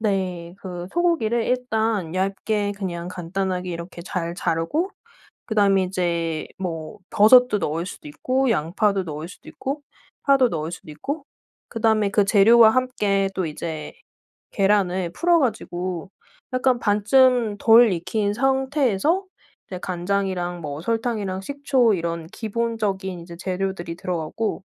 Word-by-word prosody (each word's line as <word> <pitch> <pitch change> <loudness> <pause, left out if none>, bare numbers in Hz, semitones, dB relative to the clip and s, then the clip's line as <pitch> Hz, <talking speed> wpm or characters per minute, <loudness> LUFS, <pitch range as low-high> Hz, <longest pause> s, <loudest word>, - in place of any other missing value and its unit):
네 185 -5 -2
그 180 -2 -6
소고기를 310 -10 +1
일단 220 -8 -1
얇게 200 +2 -1
그냥 175 -3 -4
간단하게 180 +1 -3
이렇게 170 +1 -7
잘 170 -2 -3
자르고 180 - -1 0.6
그다음에 200 -3 +3
이제 170 -3 -1
뭐 165 -4 -5
버섯도 245 +2 +6
넣을 165 -1 -2
수도 185 - -9
있고, 255 - 0
양파도 195 +2 +1
넣을 155 0 -6
수도 - - -15
있고, 275 +2 -4 0.4
파도 275 -3 +5
넣을 160 -5 -3
수도 165 - -9
있고, 280 - -5 0.4
그다음에 220 -3 +1
그 205 -1 +3
재료와 220 +3 +7
함께 210 -6 +1
또 185 - -1
이제 155 0 -6 0.6
계란을 190 -3 +1
풀어 345 - +3
가지고 185 - -3 0.4
약간 255 -1 +2
반쯤 225 +1 +3
덜 225 0 +7
익힌 200 +4 -1
상태에서 270 - +1 0.4
이제 185 - -6
간장이랑 180 -1 -2
뭐 145 -2 -5
설탕이랑 220 -2 -2
식초 270 -2 +2
이런 170 -2 -3
기본적인 210 -3 -3
이제 170 0 -10
재료들이 185 -2 -3
들어가고 180 +5 -3
195 Hz, 285 characters per minute, -23 LUFS, 175-230 Hz, 0.6 s, 재료와